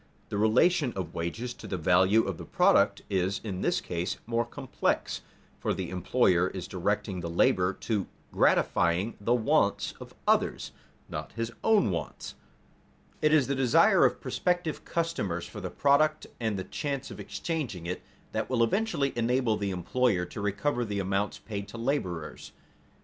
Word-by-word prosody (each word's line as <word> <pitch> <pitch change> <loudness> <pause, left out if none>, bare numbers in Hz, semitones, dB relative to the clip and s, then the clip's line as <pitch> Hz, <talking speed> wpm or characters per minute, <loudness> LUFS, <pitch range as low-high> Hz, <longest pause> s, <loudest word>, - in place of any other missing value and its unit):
_ - - -35
The - - -2
relation 125 +5 +3
of 90 -4 -4
wages 110 +9 -3
to - - -11
the 95 - -2
value 95 +6 +4
of 95 -4 -4
the - - -6
product - - +3
is 95 +1 0
in 95 -4 -4
this - - +1
case 85 0 -3
more 115 +1 0
complex, 120 - -2 0.4
for - - -1
the 90 -2 -4
employer 90 -1 +2
is 95 -2 -6
directing 100 +1 -1
the 85 -1 -4
labor 90 +2 +3
to 105 -4 -1 0.2
gratifying 90 +7 +2
the 120 +4 +2
wants 115 -3 +2
of - - -11
others, - - +1 0.4
not - - -6
his 115 0 -3
own 215 - +4
wants. 85 -3 -5 0.9
It 155 - +4
is 155 -4 +5
the 140 - -1
desire 130 -3 +5
of - - +3
prospective 175 -3 -1
customers 135 - -2
for 105 - -8
the 95 - -4
product, 155 +5 +2
and 110 -4 -1
the 95 - -3
chance 140 +8 -4
of - - -9
exchanging 135 - -4
it, 90 +1 -3 0.3
that 110 -1 -2
will 120 -3 +3
eventually 145 - 0
enable 120 -1 +2
the 100 -1 -2
employer 95 +2 +1
to 100 - -7
recover 120 +6 0
the 105 -3 -3
amounts 100 +1 -1
paid 100 -2 -6
to 110 - -9
laborers. 105 - -3
105 Hz, 165 wpm, -29 LUFS, 95-125 Hz, 0.9 s, is